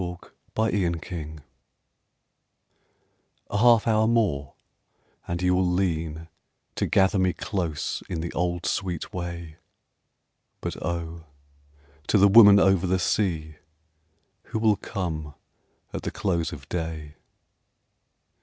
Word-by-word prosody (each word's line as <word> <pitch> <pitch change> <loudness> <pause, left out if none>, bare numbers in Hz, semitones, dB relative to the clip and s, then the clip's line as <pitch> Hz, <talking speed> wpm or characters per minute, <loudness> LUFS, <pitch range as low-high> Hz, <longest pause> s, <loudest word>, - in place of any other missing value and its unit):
Dusk 90 -1 -7 0.2
in 100 -5 +1
War - - -6
Time 80 -3 -7 2.1
A 105 - 0
half 115 -1 +5
hour 110 -1 +3
more 95 -12 0 0.7
and 85 - -2
you 90 0 +3
will 90 +1 +2
lean 80 -3 -1 0.5
To - - 0
gather 95 +1 +3
me 95 -1 +2
close 85 -7 -3
in 85 - -3
the 85 - -5
old 90 0 -1
sweet 90 -5 -2
way 85 -3 -6 1.0
But - - -4
oh, 85 -1 -4 0.8
to - - +3
the 100 +1 +6
woman 100 -1 +8
over 95 -2 +3
the 95 +1 +2
sea 85 -5 -1 0.9
Who - - -4
will 110 -2 +3
come 80 -6 -5 0.6
at - - -4
the - - -3
close 85 -4 -1
of - - -10
day? 80 -3 -4
90 Hz, 120 wpm, -25 LUFS, 80-100 Hz, 2.1 s, woman